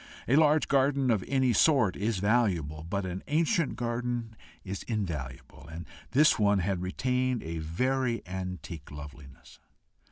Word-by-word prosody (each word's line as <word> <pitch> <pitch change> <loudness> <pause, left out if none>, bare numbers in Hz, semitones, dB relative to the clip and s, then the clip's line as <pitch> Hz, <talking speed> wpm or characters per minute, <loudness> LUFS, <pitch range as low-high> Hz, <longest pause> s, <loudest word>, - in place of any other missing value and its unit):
A 130 - +3
large 155 0 +4
garden 135 -1 +2
of 105 -5 +1
any 130 -3 +2
sort 125 - +4
is 105 +1 -1
valuable, 95 -8 +1
but 100 +1 -1
an 90 +1 -4
ancient 165 - +1
garden 120 -1 -3 0.3
is 95 0 -5
invaluable, 75 - -5
and 85 +1 -7 0.2
this 150 0 +4
one 105 -1 +4
had 95 -1 -1
retained 125 +6 -1
a 80 0 -4
very 120 +8 -1
antique 90 -4 -6
loveliness. 70 -2 -12
105 Hz, 135 wpm, -29 LUFS, 85-130 Hz, 0.3 s, large